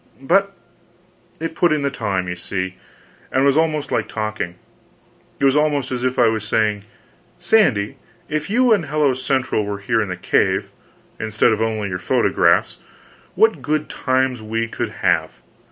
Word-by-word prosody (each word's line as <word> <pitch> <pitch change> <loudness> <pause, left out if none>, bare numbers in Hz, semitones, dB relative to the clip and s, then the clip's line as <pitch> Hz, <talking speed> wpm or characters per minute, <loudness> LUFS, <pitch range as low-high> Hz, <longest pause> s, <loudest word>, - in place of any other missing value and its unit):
But 195 +8 +2 0.9
it 165 +1 -4
put 175 0 +2
in 150 -2 +1
the 140 - 0
time, 100 -7 -2
you 90 - -3
see, 95 +1 -4 0.6
and 135 +1 +2
was 140 -1 +4
almost 155 -2 0
like - - 0
talking; 110 -5 -4 0.8
it - - +2
was 135 0 +4
almost 150 -3 +1
as 125 -1 -3
if 130 0 0
I 120 - +5
was 110 -2 0
saying, 105 -1 0 0.5
"Sandy, 175 - +2 0.3
if 155 +2 -3
you 245 +2 +4
and 180 -8 0
Hello 145 -2 +2
Central 130 -3 0
were 100 0 -4
here 110 +3 0
in 105 - -3
the 90 - -4
cave, - - +1 0.5
instead 110 +1 +2
of 110 - -2
only 110 -2 -1
your 90 -1 -3
photographs, 90 - +2 0.6
what 220 -10 +3
good 150 +2 -1
times 130 -2 0
we 115 +1 -2
could - - -3 0.2
have!" - - +1
130 Hz, 165 wpm, -20 LUFS, 110-150 Hz, 0.9 s, I